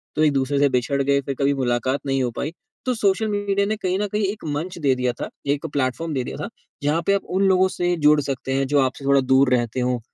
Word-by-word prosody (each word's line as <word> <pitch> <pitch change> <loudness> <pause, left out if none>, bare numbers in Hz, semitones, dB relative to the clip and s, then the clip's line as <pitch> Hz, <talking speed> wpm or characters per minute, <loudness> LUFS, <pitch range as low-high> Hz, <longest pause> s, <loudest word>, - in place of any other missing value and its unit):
तो 155 - +2
एक-दूसरे 140 -1 +1
से 140 0 +4
बिछड़ 130 +2 0
गए, 140 0 +2
फिर 140 0 -4
कभी 140 0 +2
मुलाकात 125 +3 0
नहीं 135 -1 0
हो 120 - -1
पाई। 150 - -2 0.3
तो 255 - +1
सोशल 205 0 +1
मीडिया 200 -1 0
ने 215 +2 -1
कहीं 185 -3 -1
न 210 - 0
कहीं 210 0 0
एक 205 +2 -4
मंच 165 +6 -4
दे 140 -4 +2
दिया 125 -1 0
था, - - -6 0.2
एक 140 0 0
प्लेटफ़ॉर्म 145 +4 -1
दे 130 -3 -1
दिया - - -6
था - - -5 0.3
जहाँ 150 +3 +1
पे 200 - +4
आप 200 - 0 0.2
उन - - +3
लोगों 190 0 +4
से 175 -1 0
जुड़ 150 0 +6
सकते 135 -1 -3
हैं 135 +1 +1
जो 145 +1 +2
आपसे 130 +1 -2
थोड़ा 140 0 +4
दूर 130 0 +4
रहते 120 0 0
हों, 125 -1 0
140 Hz, 255 wpm, -22 LUFS, 130-180 Hz, 0.3 s, जुड़